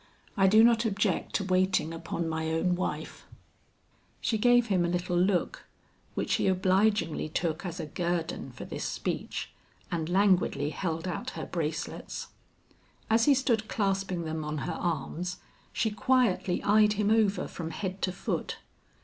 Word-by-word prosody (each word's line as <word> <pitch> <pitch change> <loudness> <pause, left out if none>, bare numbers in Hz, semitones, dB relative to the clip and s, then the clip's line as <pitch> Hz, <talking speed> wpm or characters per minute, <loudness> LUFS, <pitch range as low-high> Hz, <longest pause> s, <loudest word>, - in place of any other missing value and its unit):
I 195 -2 +4
do 215 +3 +7
not 235 0 +5
object 210 -3 0
to 200 - +1
waiting 185 -3 +1
upon 165 0 -3
my 160 0 -2
own 170 +3 +1
wife." 180 +1 -4 0.9
She 220 - 0
gave 245 +1 +5
him 190 -6 +2
a - - +1
little 180 0 -1
look 190 - +1 0.5
which - - -1
he - - +2
obligingly 185 -3 +2
took 165 +3 -2
as 175 +1 -6
a 160 - -3
guerdon 170 -3 -2
for - - -9
this - - -5
speech, - - -3 0.4
and 165 -1 -2
languidly 180 -6 +2
held 165 +1 -3
out 180 - -3
her 160 - -4
bracelets. 160 -2 -4 0.8
As 225 +1 +4
he 285 - +6
stood 235 -5 +1
clasping 195 -4 -1
them 160 0 -3
on 150 0 -3
her - - -2
arms, 175 +2 -3 0.3
she 220 - 0
quietly 215 -4 +1
eyed 210 0 +5
him 210 0 +1
over 210 -4 +2
from 160 -2 -6
head 190 +3 -4
to 185 - +1
foot. 180 - -3
185 Hz, 155 wpm, -29 LUFS, 165-210 Hz, 0.9 s, do